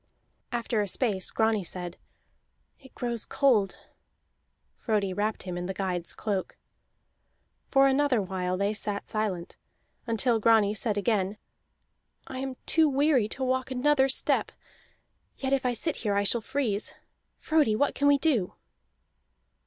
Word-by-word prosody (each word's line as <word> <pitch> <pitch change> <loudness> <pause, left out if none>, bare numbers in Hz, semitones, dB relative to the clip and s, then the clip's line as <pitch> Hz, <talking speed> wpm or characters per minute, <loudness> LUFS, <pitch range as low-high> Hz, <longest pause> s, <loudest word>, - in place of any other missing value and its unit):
After 235 -2 -1
a 205 - -1
space 195 -2 0
Grani 220 -2 +1
said, 175 0 -5 0.8
"It 265 - -18
grows 235 -2 -2
cold." 250 -8 +2 1.0
Frodi 205 -4 -1
wrapped 210 +2 -2
him 180 -2 -4
in 175 - -4
the 190 - -4
guide's 180 -3 -3
cloak. 200 -3 -3 1.1
For 270 0 +5
another 270 -2 +3
while 185 -2 -2
they 200 +2 0
sat 205 -1 -3
silent, 195 -5 -3 0.5
until 230 0 +2
Grani 215 -2 +4
said 215 0 -2
again: 205 -1 0 0.9
"I 260 - -7
am 265 -1 -4
too 320 -2 +4
weary 275 -4 +3
to 265 - -5
walk 260 0 0
another 265 +1 +2
step, 270 - +2 0.9
yet 270 0 -1
if 265 -2 +1
I 245 - +1
sit 315 +6 -2
here 205 -3 -1
I 200 - +2
shall 230 +3 +1
freeze. 230 -4 -2 0.4
Frodi, 300 -9 +2
what 285 +6 +1
can 285 - +1
we 285 0 +6
do?" 270 - +1
225 Hz, 140 wpm, -28 LUFS, 200-265 Hz, 1.1 s, we